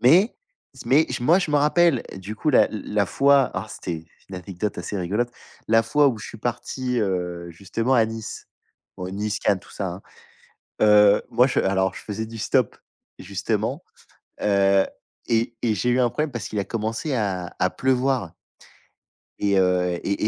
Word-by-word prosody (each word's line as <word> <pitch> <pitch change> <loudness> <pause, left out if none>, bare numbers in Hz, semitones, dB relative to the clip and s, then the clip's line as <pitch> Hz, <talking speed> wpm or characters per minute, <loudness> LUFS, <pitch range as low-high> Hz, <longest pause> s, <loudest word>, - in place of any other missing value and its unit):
Mais, 175 - +5 0.4
c - - -12
mais 150 +4 +4
moi, 165 +9 +4
je 180 - -2
me 150 - +3
rappelle, 150 -1 +3
du 100 +3 -7
coup 155 - 0
l 130 - -1
la - - +5
la 105 -1 -1
fois 140 +6 +4
oh, 95 - -2
c'était 80 -5 -6 0.2
une 95 - -8
anecdote 95 +2 -4
assez 95 +3 -4
rigolote. 105 +7 -1 0.4
La 115 0 +5
fois 145 +5 +3
où 115 -4 -3
je - - -8
suis 115 - -10
parti, 125 +2 -2
heu, 90 -3 -2
justement 105 +9 -1
à 115 -2 +5
Nice. 115 -1 -7 0.5
Bon 90 0 -5
Nice, 105 +1 -2
Cannes, 100 - +2
tout - - -18
ça, 100 - -3
hein. 90 +3 -7 0.8
Heu, 105 -1 +6
moi 125 +3 +4
je - - 0
alors 95 -1 +1
je - - -8
faisais 110 +1 -4
du 115 +1 -9
stop, 120 +1 +1 0.4
justement. - - -2 0.6
Heu 100 -1 +3 0.4
et 115 +1 0
et 110 -3 +2
j'ai 120 +6 0
eu 125 - +2
un 120 - +4
problème, 150 +3 -2
parce 120 -4 -4
qu'il 105 - -4
a - - -2
commencé 115 - -3
à 95 -6 -2
à 90 - +2
pleuvoir, 130 -2 +1
heu - - -17 1.1
et 100 -1 +1
heu 90 -1 +2
et 100 +1 -1
110 Hz, 185 wpm, -23 LUFS, 95-125 Hz, 1.1 s, Heu